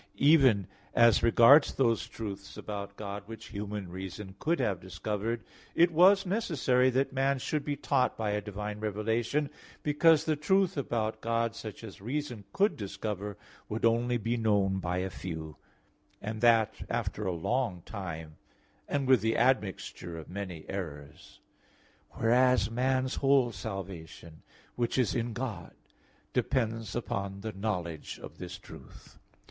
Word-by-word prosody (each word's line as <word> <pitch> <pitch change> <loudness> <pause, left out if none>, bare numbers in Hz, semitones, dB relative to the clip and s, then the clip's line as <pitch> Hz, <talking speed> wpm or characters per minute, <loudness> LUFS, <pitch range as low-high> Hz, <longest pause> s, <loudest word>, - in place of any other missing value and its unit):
Even 135 - +5 0.3
as 115 -3 +6
regards 120 +6 +7
those 115 -5 +2
truths 100 -3 -7
about 100 -1 -6
God 100 -1 -5
which 115 0 -9
human 105 -2 -5
reason 95 +2 -7
could 170 +2 +1
have 105 -8 0
discovered, 105 +5 -3 0.3
it 170 +1 +5
was 190 +5 +6
necessary 145 - +2
that 135 +2 0
man 135 +1 +2
should 150 +3 -2
be 145 0 -2
taught 140 -2 +1
by 110 -2 -1
a 105 0 0
divine 105 0 -5
revelation; 110 +7 0 0.4
because 155 +1 +5
the 155 - +2
truth 190 +5 +2
about 115 -6 -2
God 115 0 0
such 110 +1 -8
as 105 -3 -10
reason 125 -2 -4
could 205 +2 +2
discover, 100 0 -4 0.3
would 110 +2 -1
only 120 +1 +2
be 115 +2 -1
known 100 -4 +2
by 90 -1 -2
a 95 +1 -1
few, 80 -5 -6 0.6
and 110 +1 -5
that 115 -2 +5 0.2
after 105 -1 -2
a - - +1
long 90 +1 -1
time, 80 -7 -6 0.5
and 140 -2 -1
with 130 -5 +6
the 110 +1 +1
admixture 105 -8 0
of 80 - -8
many 90 -4 -6
errors. 75 -7 -7 0.7
Whereas 120 -2 +3
man's 130 +2 +1
whole 135 -3 +4
salvation, 95 -6 -7 0.3
which 120 +1 -1
is 125 -6 +2
in 120 -1 -1
God, 115 -7 -5 0.6
depends 115 -3 0
upon 100 -4 -3
the 110 +1 -5
knowledge 90 -6 -3
of - - -10
this 90 0 -6
truth. - - -14
110 Hz, 140 wpm, -30 LUFS, 100-130 Hz, 0.7 s, regards